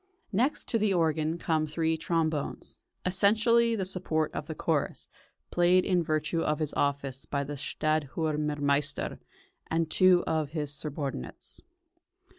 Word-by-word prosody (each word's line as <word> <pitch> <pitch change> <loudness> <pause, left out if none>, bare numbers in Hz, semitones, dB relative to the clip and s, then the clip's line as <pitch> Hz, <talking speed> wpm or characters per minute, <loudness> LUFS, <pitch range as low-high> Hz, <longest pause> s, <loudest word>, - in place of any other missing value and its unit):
Next 245 +9 0
to 230 - +2
the 205 -2 +2
organ 160 -1 +1
come 160 -2 0
three 160 +1 0
trombones, 160 -2 -2 0.2
essentially 225 +5 +3
the 195 -4 -1
support 160 -4 -1
of 150 - -5
the 160 - -5
chorus, 155 -2 -1 0.4
played 175 +1 +4
in 180 -2 +2
virtue 155 +1 0
of 150 -1 0
his 155 -2 -2
office 140 -2 -1
by 140 - -2
the 145 +1 -6
"stadtthürmermeister" 150 -1 -1 0.5
and 165 -1 0
two 185 -1 +5
of 155 -2 0
his 150 -3 -2
subordinates. 145 -1 -6
160 Hz, 130 wpm, -29 LUFS, 150-175 Hz, 0.5 s, two